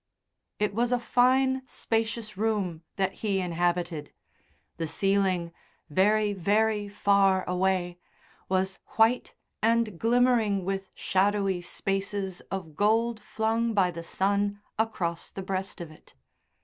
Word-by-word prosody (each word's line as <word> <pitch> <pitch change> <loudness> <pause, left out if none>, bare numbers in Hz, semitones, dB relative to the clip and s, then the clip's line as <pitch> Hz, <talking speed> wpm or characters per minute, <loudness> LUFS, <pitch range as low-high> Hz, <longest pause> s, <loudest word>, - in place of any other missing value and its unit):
It 210 -1 0
was 240 +3 +1
a 245 - +2
fine, 260 +2 +3
spacious 225 -2 -2
room 200 -6 -1
that 190 -1 0
he 200 -3 +1
inhabited. 175 -3 -1 0.7
The 165 -1 -2
ceiling 190 -2 +1 0.4
very, 205 +5 +3
very 205 +2 +1
far 200 -2 +3
away 180 -1 0 0.5
was 190 0 0 0.2
white 225 +3 +3 0.3
and 225 -4 +2
glimmering 230 -5 +3
with 195 0 -3
shadowy 195 0 +1
spaces 195 +1 -3
of 175 -6 -5
gold 225 +4 +2
flung 225 +1 -1
by 185 -3 +3
the 170 -1 -7
sun 200 +4 0 0.2
across 180 -7 -1
the 195 - -7
breast 190 0 -3
of 170 -3 -7
it. 155 - -19
200 Hz, 120 wpm, -28 LUFS, 185-220 Hz, 0.7 s, fine